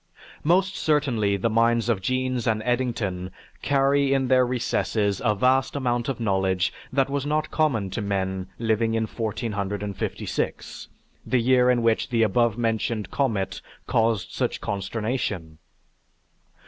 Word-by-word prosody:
Most 185 +4 +2
certainly 125 -10 +1
the 100 - 0
minds 115 +1 +2
of 115 -5 +1
Jeans 130 +2 -1
and 110 -1 +1
Eddington 115 -7 -1 0.3
carry 140 0 +2
in 130 -2 0
their 130 -1 +4
recesses 110 -4 0
a 105 -3 +2
vast 130 +6 +2
amount 120 -3 -1
of 130 - -3
knowledge 95 -4 +1 0.2
that 135 0 +2
was 140 0 -2
not 155 +1 -1
common 125 -12 +1
to 105 - -3
men 95 -2 -2
living 115 0 +1
in 115 - +1
1456, 105 -3 -3 0.4
the 130 - +1
year 125 +1 +4
in 120 -2 +2
which 115 -1 +2
the 115 -2 +2
above 115 +1 +2
mentioned 115 -3 -1
comet 110 -9 -1 0.2
caused 115 -3 +1
such - - -2
consternation. 100 -5 -3
115 Hz, 135 wpm, -25 LUFS, 100-130 Hz, 0.4 s, their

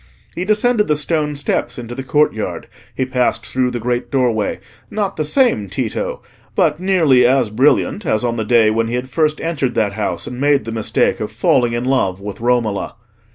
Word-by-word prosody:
He 180 - -3
descended 215 +1 +2
the 150 - +2
stone 150 0 -1
steps 140 0 -2
into 120 -1 -7
the 135 - -5
courtyard, 135 -5 0 0.3
he 130 - 0
passed 125 -1 0
through 130 -1 0
the 120 - -4
great 120 +1 -2
doorway, 120 -5 0 0.3
not 205 -3 -2
the 155 - -1
same 150 - +1
Tito, 110 +3 -3 0.3
but - - +2
nearly 165 -9 +4
as 125 -4 +2
brilliant 140 - +2
as 115 - 0
on 120 -1 0
the 110 - -2
day 110 -1 +4
when 115 +1 0
he 120 - -2
had 125 +1 -4
first 155 +1 +1
entered 145 -6 -2
that 105 -2 +1
house 105 0 -3
and 125 +1 -6
made 145 -5 +2
the 115 - -5
mistake 110 -1 0
of 105 0 -4
falling 120 +2 +2
in 120 +1 -2
love 110 -8 +1
with 100 +2 -7
Romola. 120 -5 0
125 Hz, 195 wpm, -18 LUFS, 115-150 Hz, 0.3 s, nearly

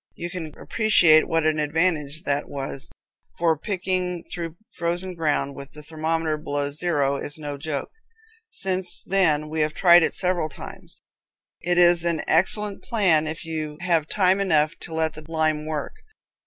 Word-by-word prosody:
You 175 0 -6
can 160 -4 -7
appreciate 175 -8 +4
what 165 -1 +1
an 155 -1 +2
advantage 155 0 0
that 145 0 -1
was, 135 -1 -4 0.5
for 165 -1 +2
picking 180 0 -2
through 170 -1 -5 0.2
frozen 175 +2 -2
ground, 150 -4 -1
with 140 0 -11
the 150 - -10
thermometer 160 0 -2
below 145 -1 -2
zero, 145 -3 0
is 145 +2 -5
no 145 -2 -5
joke. 145 0 -4 0.6
Since 190 - 0
then 160 -6 +2
we 155 +1 -2
have 150 0 0
tried 175 -1 +7
it - - 0
several 180 -4 0
times. - - -11 0.6
It 175 0 0
is 175 -1 +5
an 170 -2 0
excellent 200 +4 +1
plan 175 -9 +2
if 155 +1 -5
you 155 -2 -4
have 170 -4 +1
time 190 0 +2
enough 155 -6 +2
to 165 - -9
let 160 0 0
the - - -9
time 155 -1 -1
work. 155 -2 -3
160 Hz, 160 wpm, -24 LUFS, 150-175 Hz, 0.6 s, tried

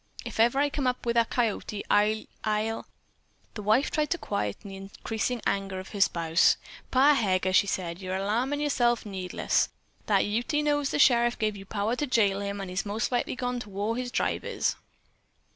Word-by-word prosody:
If - - -6
ever 235 +4 +4
I 285 +1 +2
come 275 -3 -1
up 250 -1 -1
wi' 235 - +1
that 235 -1 +2
coyote, 215 -3 -1
I'll 215 +1 +3 0.2
I'll 215 +1 -1 0.3
" - - -39
The 215 - -6
wife 220 +7 +2
tried 300 -1 0
to 345 - 0
quiet 105 - -2
the 200 -2 -9
increasing 220 +4 -4
anger 195 -1 -1
of 185 - -9
her 200 - -4
spouse. 165 -2 +3 0.3
"Pa 275 +3 +5
Heger," 185 -6 +1
she 200 - +5
said, 180 -2 -3
"you're 185 0 -3
alarmin' 235 +9 0
yerself 240 -6 +1
needless. 190 -3 0 0.4
That 200 -2 +3
Ute 245 +9 0
knows 290 -1 +1
the - - -1
sheriff 240 -3 +4
gave 215 -1 0
you 195 -1 -9
power 215 +3 -1
to 295 - -1
jail 205 -6 +2
him, 200 0 -3
an' 195 -1 -5
he's 185 +1 -2
mos' 215 +4 -2
likely 245 0 0
gone 250 -1 -2
to 215 - -8
whar 205 +3 -2
his 250 0 -3
tribe - - -1
is." - - -1
215 Hz, 195 wpm, -28 LUFS, 195-245 Hz, 0.4 s, Pa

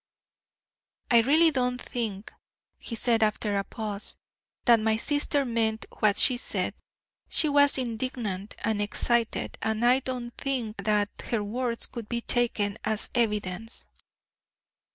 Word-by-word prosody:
"I 235 - +7
really 315 +7 +5
don't 250 -2 0
think," 220 -6 -5 0.5
he 230 - -5
said 230 0 +1
after 215 -1 +1
a 200 - +1
pause, 210 -1 -5 0.5
"that 235 -2 +6
my 220 0 +1
sister 290 +2 0
meant 225 -2 0
what 210 -1 +3
she 250 - +6
said. - - -1 0.6
She 310 - +3
was 285 -1 +5
indignant 225 -5 -3
and 220 -2 0
excited, 230 +2 0
and 220 +1 0
I 250 +2 +5
don't 245 -2 -5
think 250 -6 -3
that 210 -1 +2 0.2
her 225 -3 0
words 235 +2 -2
could 230 -3 -8
be 235 -1 -1
taken 220 -4 0
as 215 0 -1
evidence." 215 -2 -1
230 Hz, 130 wpm, -27 LUFS, 215-250 Hz, 0.6 s, I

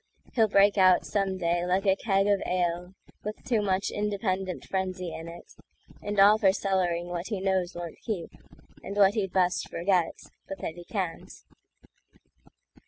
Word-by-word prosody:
He'll 225 -3 +4
break 200 0 +4
out 185 -1 +5
some 195 -2 -1
day 175 -1 0
like 185 +3 0
a 190 -1 +4
keg 195 -1 +1
of 205 -1 +3
aleWith 180 +4 -4
too 230 -4 +1
much 195 -1 0
independent 195 -3 -2
frenzy 185 -2 -3
in 165 - -7
it; 170 +1 -11 0.5
And 205 -1 -2
all 205 +2 +7
for 200 -4 +5
cellaring 185 -3 0
what 175 0 -5
he 210 -4 -3
knows 190 -1 0
won't 175 -2 -7
keep, 200 -8 -4 0.5
And 200 - -6
what 200 -1 +5
he'd 195 -4 -1
best 180 -1 +1
forget—but 185 +1 -2
that - - -5
he 175 +1 -12
can't. 185 -6 -4
190 Hz, 155 wpm, -27 LUFS, 175-200 Hz, 0.5 s, all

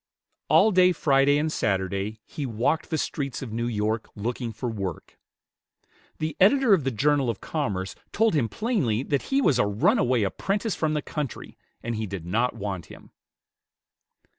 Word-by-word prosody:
All 220 - +6
day 185 -1 +5
Friday 140 -2 +3
and 155 +1 0
Saturday 100 - -1
he 150 - -6
walked 120 +7 0
the 160 - 0
streets 140 -4 -3
of 115 -4 -7
New 115 +1 -1
York, 110 0 -1
looking 120 +2 -3
for 125 - -5
work. 100 -7 -5 1.0
The 155 -1 -3
editor 235 +4 +5
of 175 -7 +3
the - - +2
"Journal 135 +2 +1
of 115 - -3
Commerce" 100 - -3 0.2
told 225 -1 +2
him 130 -8 +1
plainly 140 - 0
that 140 -1 0
he 275 0 +2
was 140 - +3
a 125 - +4
runaway 115 +3 +2
apprentice 195 - -1
from 155 -2 -1
the 150 - -1
country, 145 -6 -5 0.3
and 115 0 -2
he 110 0 -3
did 95 -4 -6
not 115 +8 0
want 100 -4 -5
him. - - -14
125 Hz, 165 wpm, -26 LUFS, 105-155 Hz, 1.0 s, All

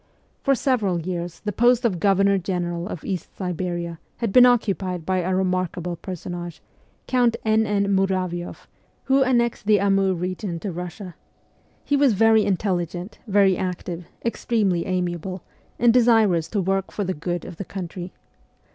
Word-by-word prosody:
For 275 -1 +3
several 220 -10 +1
years 170 0 -5
the 210 - -2
post 240 +3 +3
of 190 -7 +1
Governor 195 0 +3
General 175 -1 -3
of 180 - -7
East 185 -3 -5
Siberia 175 -2 -3 0.2
had 230 -5 -2
been 250 0 +8
occupied 195 -7 0
by 185 +1 +1
a 185 +1 0
remarkable 180 -2 -1
personage, 175 -1 -7 0.5
Count 245 -2 +2
N. 220 0 +3
N. 200 -1 +1
Muravioff, 185 -2 -1 0.4
who 270 +1 +3
annexed 235 -5 +1
the 210 -2 +5
Amur 195 -1 +2
region 180 0 -4
to 200 - -3
Russia. 180 +2 -7 0.7
He 285 - +1
was 280 -4 +4
very 220 +1 +5
intelligent, 180 -1 -2
very 195 -2 +4
active, 180 -1 -4 0.2
extremely 210 -7 0
amiable, 180 0 -3 0.3
and 235 -1 +4
desirous 225 -9 +4
to 205 - -1
work 195 +1 -1
for 205 - -3
the 185 -1 -1
good 175 +2 -4
of 175 - -9
the 200 - -4
country. 180 -1 -6
190 Hz, 150 wpm, -23 LUFS, 175-215 Hz, 0.7 s, been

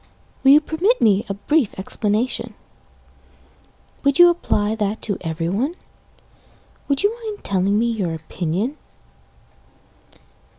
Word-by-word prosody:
Will 270 - +5
you 300 - +7
permit 365 +11 +1
me 205 -1 +3
a 195 - -2
brief 265 +3 0
explanation? 210 +5 -2 1.5
Would 280 -1 +2
you 350 0 +8
apply 215 -11 0
that 215 0 -2
to 200 -3 -2
everyone? 175 - -2 1.1
Would 280 +3 0
you 415 +3 +2
mind 425 -2 -6
telling 195 +1 +1
me 230 - +2
your 185 -7 -2
opinion? 180 - -3
220 Hz, 115 wpm, -21 LUFS, 195-295 Hz, 1.5 s, you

